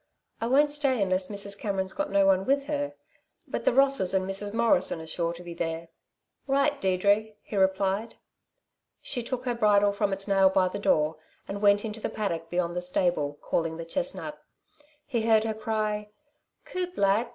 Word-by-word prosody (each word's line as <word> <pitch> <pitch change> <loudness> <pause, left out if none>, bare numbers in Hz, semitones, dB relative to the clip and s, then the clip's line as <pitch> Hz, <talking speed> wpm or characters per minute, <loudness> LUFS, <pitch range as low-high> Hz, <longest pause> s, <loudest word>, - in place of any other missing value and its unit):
"I 230 - -1
won't 290 +4 +4
stay 280 -4 +1
unless 185 -1 +1
Mrs. 200 -1 -3
Cameron's 195 -2 -2
got 295 - -2
no 200 0 +3
one 190 -1 +4
with 275 +5 +2
her; 290 0 -3 0.5
but - - -4
the - - +5
Rosses 270 -8 +3
and 190 0 +1
Mrs. 195 +1 -3
Morrison 220 -7 +2
are 160 - -8
sure 170 +1 -2
to 170 +1 -9
be 175 -1 -7
there." 165 0 -4 0.6
"Right, 280 +1 +1
Deirdre!" 200 +3 +2
he - - -7
replied. 195 +3 +1 0.8
She 250 - -3
took 250 +2 -4
her 245 - 0
bridle 205 -3 +4
from 200 0 -1
its 195 +1 -3
nail 195 -1 +5
by 185 -1 +2
the 200 - -5
door, 155 -5 +2 0.3
and 200 +1 -5
went 205 +1 +4
into 220 0 -5
the - - -3
paddock 165 -6 -3
beyond 175 -1 -1
the 180 - -1
stable, 175 -5 0
calling 165 -1 -1
the 165 - -6
chestnut. - - -4 0.6
He 240 -5 -1
heard 220 -1 +4
her 220 -1 -1
cry: 215 -1 -2 0.6
"Coup 360 -1 -3
lad! 200 +4 +2
200 Hz, 185 wpm, -27 LUFS, 185-230 Hz, 0.8 s, the